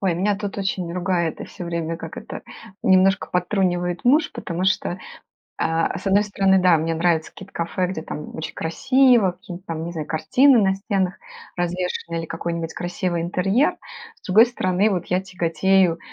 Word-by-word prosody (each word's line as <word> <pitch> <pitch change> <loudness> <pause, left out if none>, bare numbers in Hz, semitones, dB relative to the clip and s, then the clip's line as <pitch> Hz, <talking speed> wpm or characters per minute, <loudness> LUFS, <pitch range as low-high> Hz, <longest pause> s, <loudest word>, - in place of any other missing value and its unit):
Ой, 185 -4 +1
меня 200 +3 +1
тут 205 -1 -5
очень 185 -3 -2
ругает 175 -2 -1
и - - -4
всё 175 - -9
время, 165 -1 -3
как - - -9
это, - - -8 0.4
немножко 190 +1 +3
подтрунивает 180 -1 0
муж. 295 +6 +4
Потому 175 +1 -4
что, 190 -1 0 0.6
а, 165 0 0
с - - -5
одной 200 +2 +4
стороны, 195 -2 +2
да, 180 -2 +5
мне 165 +1 -1
нравятся 165 -1 +1
какие-то 195 - -13
кафе, 170 +2 -1
где 175 -4 -4
там 150 - -7
очень 160 - -6
красиво, 245 +3 +3
какие-нибудь 180 +2 -11
там, 160 -1 -4
не 170 - -5
знаю, 155 -3 -5
картины 245 - +4
на 190 -2 +3
стенах 195 -2 -1 0.4
развешены. 175 -1 -2
Или 165 - -3
какой-нибудь 165 0 -4
красивый 175 -1 -2
интерьер. 195 - +1 0.4
С - - -23
другой 220 +6 +6
стороны, 195 -3 +1
вот 180 -4 -2
я 180 +1 +1
тяготею, 180 -1 +1
180 Hz, 170 wpm, -22 LUFS, 170-195 Hz, 0.6 s, другой